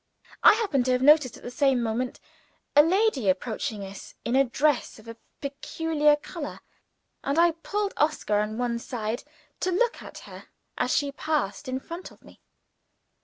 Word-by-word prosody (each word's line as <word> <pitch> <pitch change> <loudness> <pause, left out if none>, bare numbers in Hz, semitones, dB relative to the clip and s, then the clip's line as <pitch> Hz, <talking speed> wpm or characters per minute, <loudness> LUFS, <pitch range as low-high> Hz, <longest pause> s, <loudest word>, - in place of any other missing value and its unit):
I - - +9
happened 385 - 0
to 255 - +2
have 250 +1 +1
noticed, 295 -3 +5
at - - -17
the 245 - -6
same 270 0 +2
moment, 235 +2 -2 0.6
a 295 - +10
lady 335 - +2
approaching 210 +2 -2
us 195 0 -10
in 235 - 0
a 270 - +6
dress 275 +2 0
of 220 - -16
a 230 - -8 0.3
peculiar 300 +2 +1
color; 295 0 -7 0.6
and 280 +3 -1
I 340 0 +6
pulled 400 +5 -3
Oscar 295 -9 +1
on 210 +1 -2
one 240 -1 -1
side, 230 -1 -4 0.4
to 370 - 0
look 470 +6 +1
at - - -10
her - - -11 0.3
as 250 - +1
she 280 -1 0
passed 295 -4 -2
in 260 0 -2
front 335 +6 -8
of - - -20
me. - - -17
275 Hz, 170 wpm, -26 LUFS, 235-315 Hz, 0.6 s, a